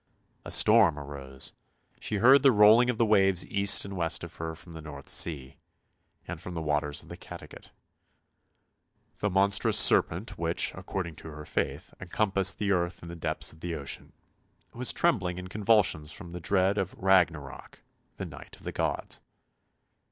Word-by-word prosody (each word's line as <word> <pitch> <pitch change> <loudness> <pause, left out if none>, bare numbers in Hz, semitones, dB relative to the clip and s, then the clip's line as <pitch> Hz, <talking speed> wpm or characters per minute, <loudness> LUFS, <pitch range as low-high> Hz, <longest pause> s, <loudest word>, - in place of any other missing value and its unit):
A - - -8
storm 80 -3 +5
arose; 70 -2 -5 0.5
she - - -3
heard 130 +7 +6
the 135 -1 +6
rolling 110 +3 +6
of 125 - -1
the 115 - +3
waves 95 -4 +2
east 100 0 +2
and 100 0 -7
west 85 -3 -1
of - - -9
her 80 0 -5
from 85 0 -14
the 80 - -9
North 70 -3 -10
Sea, 70 -6 -1 0.7
and - - -7
from 90 - -7
the 80 - -3
waters 75 -1 -1
of - - -17
the - - -8
Cattegat. - - -12 1.5
The 105 - 0
monstrous 95 +1 +2
serpent 90 +6 +3
which, 85 0 0
according 90 -3 -6
to - - -11
her 75 -1 -9
faith, 75 - -4
encom 95 +2 -2
passed 95 -1 +2
the 100 -1 -1
earth 85 -2 -1
in 85 - -9
the 85 - -8
depths 80 -2 -3
of 80 - -19
the 85 0 -4
ocean, 70 -3 -6 0.6
was 125 +1 +1
trembling 95 - 0
in 90 0 -8
convulsions 100 -7 +1
from 85 +1 -10
dread 95 +3 0
of 95 -2 -3
" - - -26
Ragnarok," 85 -7 0 0.3
the - - -5
night - - -11
of - - -20
the - - -5
gods. - - -3
90 Hz, 175 wpm, -28 LUFS, 80-100 Hz, 1.5 s, heard